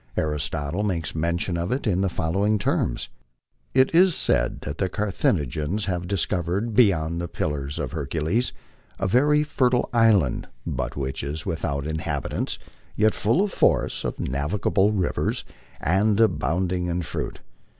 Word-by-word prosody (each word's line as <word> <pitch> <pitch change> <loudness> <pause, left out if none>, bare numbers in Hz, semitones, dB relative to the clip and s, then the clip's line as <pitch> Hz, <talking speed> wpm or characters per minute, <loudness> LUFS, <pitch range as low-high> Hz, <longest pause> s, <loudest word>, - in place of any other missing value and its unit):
Aristotle 75 +3 -1
makes 90 -6 -1
mention 85 +2 -1
of 85 +1 -2
it 130 +3 -1
in 95 -4 +1
the 95 - +1
following 100 +6 +1
terms: 60 -10 -1 0.3
" - - -61 0.3
It 130 +2 +4
is 180 0 +6
said - - +1
that 70 - -6
the 95 - +1
Carthaginians 90 - 0
have 90 -2 -2
discovered 95 +3 -1
beyond 85 -8 +3
the 85 - -3
Pillars 70 -3 -3
of - - -3
Hercules 80 - -1 0.5
a - - -2
very 150 +8 +4
fertile 125 -4 +1
island, 110 - +3 0.2
but 65 +2 -3
which 65 -1 -3
is 75 +3 -4
without 70 -3 -2
inhabitants, 80 -2 -2 0.4
yet 110 0 +3
full 115 - +2
of 205 - -2
forests, - - +2
of - - -3
navigable 90 +9 +1
rivers, 95 -4 -1 0.3
and 100 +5 +2
abounding 90 - +1
in 90 0 -1
fruit. - - -5
90 Hz, 145 wpm, -24 LUFS, 75-105 Hz, 0.5 s, is